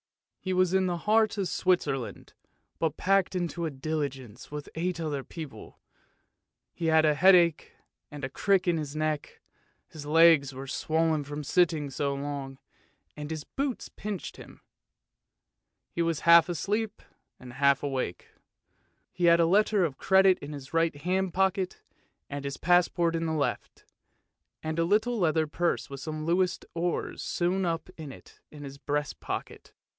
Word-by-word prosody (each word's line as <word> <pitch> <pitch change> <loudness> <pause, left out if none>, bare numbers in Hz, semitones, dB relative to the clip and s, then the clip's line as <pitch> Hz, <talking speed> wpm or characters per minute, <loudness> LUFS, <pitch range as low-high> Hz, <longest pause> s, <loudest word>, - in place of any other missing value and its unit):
He 185 - -3
was 185 0 +2
in 190 -1 +3
the 175 -1 -1
heart 215 +3 +2
of 195 -2 0
Switzerland, 140 - -1 0.5
but 160 -2 -1
packed 195 -1 +2
into 175 -1 -2
a - - -2
diligence 135 -5 -5
with 150 -1 -6
eight 170 +1 -2
other 150 -4 -3
people. 155 -2 -10 0.9
He 165 - -3
had 160 0 +5
a 150 - +4
headache 175 -1 +4 0.4
and 145 -2 -9
a 135 - -2
crick 195 +5 +1
in 170 -1 +2
his 150 -2 -5
neck, 155 -1 -2 0.5
his 145 -2 -10
legs 155 -4 +5
were 135 +1 -6
swollen 160 +2 0
from 145 +1 -6
sitting 155 -3 +1
so 140 +1 -1
long, 140 -1 -5 0.6
and 150 0 -7
his 160 -2 -4
boots 275 - -4
pinched 205 -4 -6
him. - - -13 1.3
He 170 - -2
was 165 -2 0
half 170 +1 +7
asleep 205 +5 -2 0.4
and 125 -1 -11
half 140 +1 +3
awake. 130 -10 -3 0.8
He 175 - -1
had 170 0 +6
a 165 - +5
letter 200 +2 +3
of 140 -5 -5
credit 190 -1 +4
in 145 +1 -8
his 140 -1 -10
right 165 -1 +2
hand 180 +4 -1
pocket, 190 0 0 0.4
and 140 0 -6
his 140 -1 -4
passport 175 -1 +2
in 165 0 -1
the 160 - -1
left, 150 -2 -3 0.8
and 155 +1 -2
a 165 - +3
little 220 +5 +1
leather 160 -3 +2
purse 165 -1 -1
with 140 - -6
some 155 +2 -5
Louis 180 +2 +1
d'Ors 170 +1 -3
sewn 180 +2 0
up 165 +1 -3
in 155 -4 -8
it - - -15
in 150 -1 -11
his 140 0 -9
breast 145 0 -2
pocket. - - -6
165 Hz, 160 wpm, -28 LUFS, 145-180 Hz, 1.3 s, half